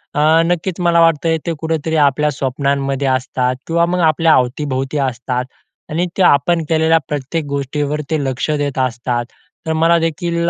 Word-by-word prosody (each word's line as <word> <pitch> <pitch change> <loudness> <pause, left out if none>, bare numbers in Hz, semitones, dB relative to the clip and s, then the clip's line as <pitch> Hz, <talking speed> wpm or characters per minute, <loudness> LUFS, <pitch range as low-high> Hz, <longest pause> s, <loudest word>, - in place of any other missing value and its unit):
अ, - - 0 0.3
नक्कीच 175 +1 -2
मला 170 0 +4
वाटत 165 -1 +3 0.2
ते 170 - -1
कुठेतरी 160 0 -2
आपल्या 150 +2 0
स्वप्नांमध्ये 140 0 -1
असतात 130 -1 0
किंवा 170 +1 +2
मग 180 +1 -1
आपल्या 160 +1 +3
अवतीभोवती 130 +2 -1
असतात. 125 +1 -3 0.4
आणि 165 +3 0
ते - - +1
आपण 170 +1 +3
केलेल्या 160 0 +3
प्रत्येक 150 +2 -3
गोष्टीवर 145 +1 -2
ते 155 -2 0
लक्ष 130 +1 -2
देत 145 -2 -3
असतात 120 -1 -1 0.4
तर 160 - +1
मलादेखील 170 +1 +1
150 Hz, 150 wpm, -17 LUFS, 135-165 Hz, 0.4 s, मला